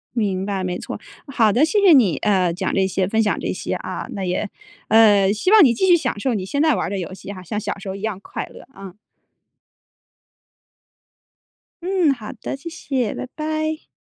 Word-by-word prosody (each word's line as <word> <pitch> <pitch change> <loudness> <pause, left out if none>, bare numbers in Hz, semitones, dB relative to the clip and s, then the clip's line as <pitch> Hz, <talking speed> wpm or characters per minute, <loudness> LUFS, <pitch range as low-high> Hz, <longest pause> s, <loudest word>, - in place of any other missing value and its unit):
明 195 -5 0
白， 195 -2 -2
没 180 -1 -3
错。 - - -6 0.3
好 235 -7 +2
的， 250 +8 +4
谢 410 +6 +2
谢 390 -3 +6
你， 235 - +5
呃， 190 -5 +2
讲 175 - -2
这 190 -1 +2
些、 190 0 -1
分 220 +1 +2
享 210 - 0
这 - - -3
些 - - -4
啊。 - - -5
那 195 -2 -4
也， 185 +3 -2 0.4
呃， 205 -3 +5
希 215 - 0
望 425 -4 +8
你 245 - +5
继 380 +11 0
续 350 - +7
享 255 -9 -2
受 255 -1 0
你 190 - -3
现 280 +9 -2
在 310 -3 +4
玩 - - -1
儿 - - -5
的 200 - -3
游 180 0 -5
戏 195 +1 -9
哈， 185 -2 -9
像 210 +4 -4
小 210 - -4
时 195 0 -8
候 190 - -4
一 200 - -10
样 215 -3 -3
快 - - -6
乐 - - -14
啊。 195 -2 -10 2.9
嗯， 360 -5 +2
好 215 -4 -9
的。 240 - -6
谢 280 +5 -8
谢， 270 -9 -2
拜 - - -5
拜。 310 0 -3
215 Hz, 225 characters per minute, -21 LUFS, 195-290 Hz, 2.9 s, 望